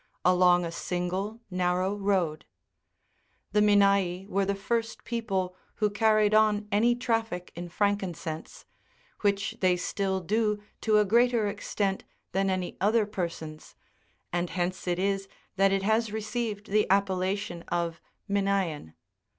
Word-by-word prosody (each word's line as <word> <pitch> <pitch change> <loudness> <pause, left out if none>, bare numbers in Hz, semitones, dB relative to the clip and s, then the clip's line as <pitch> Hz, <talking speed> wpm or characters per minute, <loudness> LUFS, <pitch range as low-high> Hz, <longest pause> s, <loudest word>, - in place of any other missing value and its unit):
125 180 +2 +1 2.2
Minaei 200 -3 +3
were 200 -1 0
the 200 +1 0
first 225 +3 -2
people 195 -6 -2 0.2
who 210 -2 +1
carried 215 0 +3
on 215 -1 +3
any 230 +4 +3
traffic 225 -7 -2
in 175 +1 -6
frankincense, 180 -5 -2 0.5
which 200 -1 0
they 185 -1 +4
still 190 +1 -1
do 210 +3 0 0.2
to 215 -1 +3
a 210 - +4
greater 235 +2 +3
extent 200 -1 -2 0.3
than 195 0 +1
any 185 -1 -2
other 215 +2 +3
persons, 165 -6 -6 0.6
and 175 0 0
hence 180 +1 -3
it 175 -1 +1
is 195 +1 0 0.3
that 195 0 +4
it 195 0 +1
has 220 +1 +1
received 215 -1 -3
the 210 +1 +3
appella 190 0 +2
tion 175 -4 -6
of 170 -1 -2
" - - -49
MinaBan." 195 - -1
200 Hz, 120 wpm, -28 LUFS, 180-210 Hz, 2.2 s, they